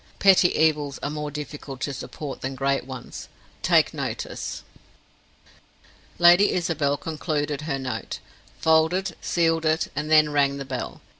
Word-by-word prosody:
Petty 190 -2 +5
evils 150 -3 +2
are 145 - -2
more 150 0 -4
difficult 145 -2 -7
to 145 - -2
support 140 +1 -7
than 135 0 -4
great 135 0 0
ones, 130 -2 -8 0.3
take - - +3
notice. - - -5 1.5
Lady 175 +4 +6
Isabel 155 -5 0
concluded 150 -2 -3
her 150 -3 -2
note, 130 -1 -4 0.4
folded, 160 +3 +2
sealed 165 -1 +1
it, 155 0 +1
and 150 +2 -3
then 155 -1 +5
rang 140 -1 +2
the 140 - -6
bell. - - -5
150 Hz, 135 wpm, -24 LUFS, 140-160 Hz, 1.5 s, Lady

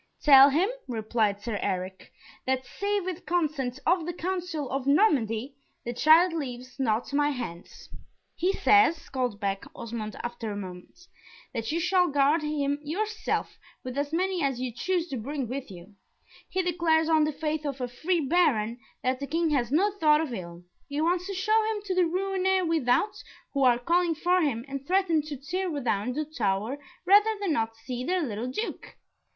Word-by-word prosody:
"Tell 275 -1 +9
him," 325 +8 +2 0.2
replied 220 -3 0
Sir 220 -4 -3
Eric, 185 -1 -4 0.4
"that 260 0 0
save 400 +8 -2
with 370 -1 -5
consent 300 -7 -1
of 345 -1 +2
the 350 - -2
council 355 -5 -3
of 270 0 -2
Normandy, 270 - +2 0.3
the 240 - -3
child 320 +7 +5
leaves 255 -4 -6
not 235 +1 0
my 290 +1 +3
hands." 230 -11 -7 0.5
"He 360 +3 +1
says," 395 -5 +3
called 250 -6 -2
back 195 -2 -2
Osmond, 220 -2 -5
after 240 -2 -4
a - - -4
moment, 185 - -9 0.5
"that 230 0 -3
you 330 - 0
shall 360 +1 +3
guard 290 +2 +3
him 290 -1 -1
yourself, 420 +9 -3 0.2
with 255 0 -6
as 285 +1 -2
many 365 +2 0
as 270 -4 0
you 255 -1 -2
choose 350 +7 -1
to 270 - -3
bring 270 +3 -4
with 260 +2 -5
you. 185 +2 -12 0.6
He 375 - 0
declares 330 -2 +2
on 320 -1 +4
the 305 - +1
faith 305 +1 -3
of 280 -2 -4
a 250 - -2
free 325 +8 -1
Baron, 260 -8 +2 0.2
that 255 0 0
the 280 - -4
King 330 +2 0
has 250 -4 0
no 385 +8 +3
thought 300 -1 +5
of 310 -6 -2
ill 175 -4 -7 0.3
he 285 +1 -3
wants 350 +3 +1
to 395 - -4
show 430 +4 +3
him 415 - -6
to 380 - -1
the 365 -1 +3
Rouennais 380 +1 0
without, 325 - +1 0.3
who 280 - 0
are 245 -2 +5
calling 340 +6 +1
for 360 +3 +2
him, 245 -7 -1
and 275 0 -6
threaten 365 -4 +2
to 295 -1 -7
tear 360 +8 -3
down 235 -1 -1
the 305 +3 -2
tower 225 -2 -2 0.3
rather 415 +3 +5
than 390 -6 0
not 225 -4 -1
see 240 +2 -6
their 360 +4 0
little 230 -2 -3
Duke. 430 - -5
290 Hz, 180 wpm, -27 LUFS, 245-350 Hz, 0.6 s, Tell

